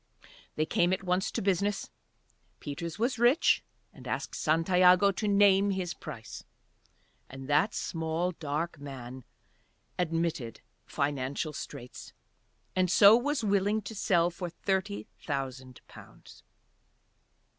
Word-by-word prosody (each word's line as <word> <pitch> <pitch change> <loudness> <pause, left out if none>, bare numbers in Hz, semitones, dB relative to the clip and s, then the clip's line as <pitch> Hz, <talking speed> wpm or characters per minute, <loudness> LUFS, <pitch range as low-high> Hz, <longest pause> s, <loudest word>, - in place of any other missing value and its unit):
They 155 - 0
came 175 +2 +1
at 190 - -2
once 180 +1 0
to - - -3
business. 200 +1 0 0.7
Peters 160 +4 -6
was 235 +2 -1
rich 245 +7 +4 0.3
and - - -12
asked - - -3
Santiago 180 +4 +4
to 210 +2 -3
name 200 -1 +4
his 185 -3 -2
price, 110 -1 -9 0.9
and 135 0 -9
that 150 +9 +2
small 165 +2 -2
dark 160 0 -4
man 130 -3 -9 0.7
admitted 165 -8 -2 0.3
financial 140 +2 -2
straits, 130 -4 -9 0.6
and 185 -1 +2
so 200 +3 +8
was 270 +2 0
willing 205 +1 +1
to 220 - -7
sell 175 -4 +2
for 175 0 -5
thirty 190 +3 -2
thousand 130 -3 -5
pounds. - - -15
175 Hz, 115 wpm, -29 LUFS, 145-200 Hz, 0.9 s, so